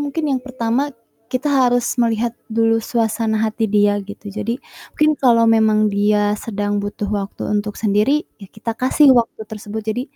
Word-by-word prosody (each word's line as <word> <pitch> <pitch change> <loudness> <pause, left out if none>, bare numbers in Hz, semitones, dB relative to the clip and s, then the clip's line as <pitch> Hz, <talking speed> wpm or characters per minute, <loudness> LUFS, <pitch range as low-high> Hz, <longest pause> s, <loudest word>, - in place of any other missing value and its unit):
mungkin 290 +2 -3
yang 265 -2 0
pertama 255 +1 -1 0.4
kita 255 +4 -1
harus 245 -3 +2
melihat 230 0 +1 0.2
dulu 225 0 +2
suasana 225 -1 -1
hati 220 +1 -1
dia 205 -1 +2
gitu. 205 +1 -9
Jadi 230 +4 -3 0.4
mungkin 305 0 +3
kalau 235 -3 +4
memang 215 -1 +3
dia 205 +1 +2
sedang 205 -2 -2
butuh 205 0 -4
waktu 200 -1 -4
untuk 210 0 -1
sendiri, 220 +8 +1 0.2
ya 195 - -10
kita 220 +3 -5
kasih 270 +2 +4
waktu 230 -2 0
tersebut. 215 0 -6
Jadi 220 +3 -2
220 Hz, 160 wpm, -19 LUFS, 210-245 Hz, 0.4 s, kalau